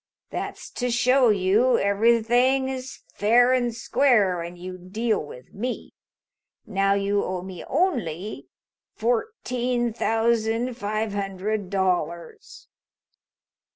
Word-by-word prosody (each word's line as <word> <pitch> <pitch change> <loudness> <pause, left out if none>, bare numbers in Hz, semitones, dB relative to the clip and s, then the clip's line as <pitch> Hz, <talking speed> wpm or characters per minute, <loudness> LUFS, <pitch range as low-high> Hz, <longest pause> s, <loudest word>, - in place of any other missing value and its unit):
That's - - -6
to 250 0 -2
show 250 +1 +4
you 210 +5 +3
everything 235 +6 +3
is 260 0 -7
fair 245 +4 +4
and 245 -2 +1
square 225 -6 +2
when 170 +1 -6
you 185 +1 -8
deal 215 +4 -1
with 130 -3 -12
me. 245 +5 -5 0.7
Now 195 -2 +1
you 200 0 +1
owe 180 -1 -3
me 185 -2 -8
only 220 - -1 0.5
fourteen 245 - -1
thousand 225 +1 +1
five 215 -1 -2
hundred 200 0 -3
dollars." 175 -4 -2
220 Hz, 105 wpm, -24 LUFS, 195-245 Hz, 0.7 s, show